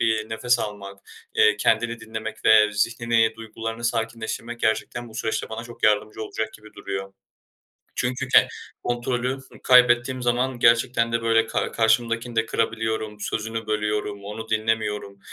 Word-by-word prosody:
bir 110 -1 +1
nefes 120 +2 +1
almak, 100 -2 -6 0.4
eee, 105 -1 +5
kendimi 115 +2 +1
dinlemek 110 0 -7
ve 105 -1 +6
zihnimi, 115 +2 +1
duygularımı 115 +1 -6
sakinleştirmek 115 0 -3
gerçekten 120 +2 -1
bu 110 - -15
süreçte 110 0 -2
bana 110 +1 -6
çok 120 -1 -13
yardımcı 105 +1 +2
olacak 110 0 -4
gibi 105 0 -15
duruyor. 95 -1 -5 0.8
Çünkü 130 +1 -2
ken - - +6 0.3
kontrolü 120 +2 -1 0.2
kaybettiğim 125 0 +5
zaman 125 +1 0
gerçekten 115 0 +3
de, 115 - 0
böyle, 115 0 +3
ka - - -2
karşımdakini 115 +1 +1
de 115 - +2
kırabiliyorum, 110 -2 -2
sözünü 115 +1 -3
bölüyorum, 105 -1 -2
onu 110 +2 -7
dinlemiyorum. 110 -2 -1
115 Hz, 135 wpm, -24 LUFS, 110-120 Hz, 0.8 s, ve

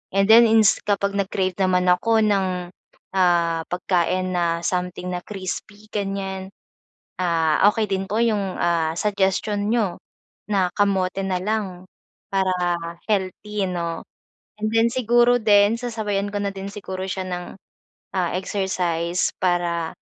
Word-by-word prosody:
and 195 - +4
then 230 +1 +8
ins 220 -2 +4
kapag 200 -1 0
nag-crave 190 -1 -1
naman 185 -1 +2
ako 220 +5 +3
ng 185 -4 0 0.4
ah, 170 -3 +2
pagkain 185 +1 0
na 170 -1 0
something 180 0 -2
na 180 - -2
crispy 205 +2 -7
ganyan 195 -2 -3 0.7
ah, 165 -3 +1
okey 220 0 0
din 195 0 -1
po 210 - -2
yung 205 -5 0
ah 165 -2 +1
suggestion 205 +1 0
niyo 210 -7 +1 0.5
na 195 -3 +2
kamote 195 -2 +1
na 190 -1 -1
lang 190 -3 -3 0.5
para 190 -1 +2 0.6
healthy 200 0 -1
'no. 170 -2 -3 0.6
And 215 0 -1
then 225 0 +3
siguro 240 0 +3
din 205 0 +5
sasabayan 215 -4 -2
ko 205 - -3
na 200 -1 -2
din 195 +1 -6
siguro 190 -2 -6
siya 185 0 -3
ng, 180 -1 -4 0.7
ah, 180 -3 0
exercise 180 -3 -1
para, 175 -2 0
190 Hz, 130 wpm, -22 LUFS, 180-205 Hz, 0.7 s, then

